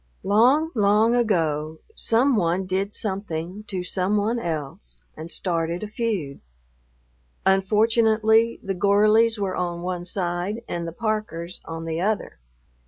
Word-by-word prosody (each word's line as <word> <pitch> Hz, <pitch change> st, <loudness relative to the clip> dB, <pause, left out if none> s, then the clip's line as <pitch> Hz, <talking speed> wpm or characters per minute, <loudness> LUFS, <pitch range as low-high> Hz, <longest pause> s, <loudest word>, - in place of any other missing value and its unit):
Long, 255 Hz, +11 st, +4 dB
long 215 Hz, +1 st, +3 dB
ago 160 Hz, -9 st, 0 dB, 0.2 s
some 250 Hz, +4 st, +2 dB
one 180 Hz, -1 st, +1 dB
did 190 Hz, +2 st, -1 dB
something 190 Hz, -2 st, -4 dB
to 185 Hz, -3 st, -3 dB
some 185 Hz, +3 st, 0 dB
one 220 Hz, +4 st, 0 dB
else 140 Hz, -, -5 dB, 0.2 s
and 160 Hz, +1 st, -8 dB
started 170 Hz, 0 st, -2 dB
a -, -, -3 dB
feud. 210 Hz, -, -3 dB, 1.0 s
Unfortunately 220 Hz, +3 st, +3 dB
the 195 Hz, -, -2 dB
Gorleys 215 Hz, +4 st, +4 dB
were 195 Hz, -2 st, -2 dB
on 175 Hz, -1 st, -3 dB
one 180 Hz, -1 st, -3 dB
side 180 Hz, +4 st, -3 dB
and 170 Hz, -1 st, -4 dB
the -, -, -4 dB
Parkers 195 Hz, -4 st, -3 dB
on 165 Hz, 0 st, -6 dB
the 165 Hz, +1 st, -2 dB
other. 210 Hz, -, -2 dB
195 Hz, 130 wpm, -24 LUFS, 170-220 Hz, 1.0 s, Long